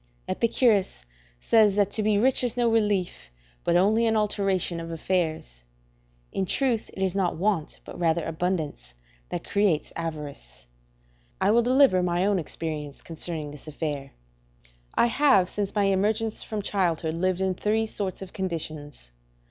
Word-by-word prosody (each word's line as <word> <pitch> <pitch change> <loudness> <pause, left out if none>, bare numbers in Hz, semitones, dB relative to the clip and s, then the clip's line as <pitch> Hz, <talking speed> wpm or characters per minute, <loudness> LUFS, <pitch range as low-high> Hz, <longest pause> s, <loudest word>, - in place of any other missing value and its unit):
Epicurus 225 - +1 0.3
says 210 - +4
that 205 -1 +2
to 215 - 0
be 210 -1 +2
rich 255 +4 +3
is 245 0 -1
no 240 -1 +2
relief, 205 - 0 0.3
but 170 - +1
only 215 +6 +3
an 225 - +2
alteration, 195 -4 0
of 165 0 -6
affairs. 160 - -2 0.7
In 190 - -2
truth, 250 -2 0
it 190 - -2
is 190 -2 0
not 185 -4 0
want, 190 -3 -1
but - - -9
rather 165 -1 +1
abundance, 160 - -3 0.3
that - - -4
creates 200 -7 +1
avarice. 150 - -7 0.7
I 195 +2 +3
will 235 +2 +5
deliver 255 -5 +4
my 175 +1 +1
own 200 -2 +2
experience 155 -3 -5
concerning 160 -2 -4
this 150 +1 -12
affair. 145 -3 -4 0.8
I - - +4
have 235 -7 +4
since 200 +2 -4
my 205 - +3
emergence 210 +3 +1
from 215 -2 -4
childhood 170 -6 0
lived 185 +2 0
in 190 -1 +1
three 215 +4 0
sorts 195 -3 -4
of 190 - -12
conditions. 155 - -4
185 Hz, 150 wpm, -26 LUFS, 160-210 Hz, 0.8 s, will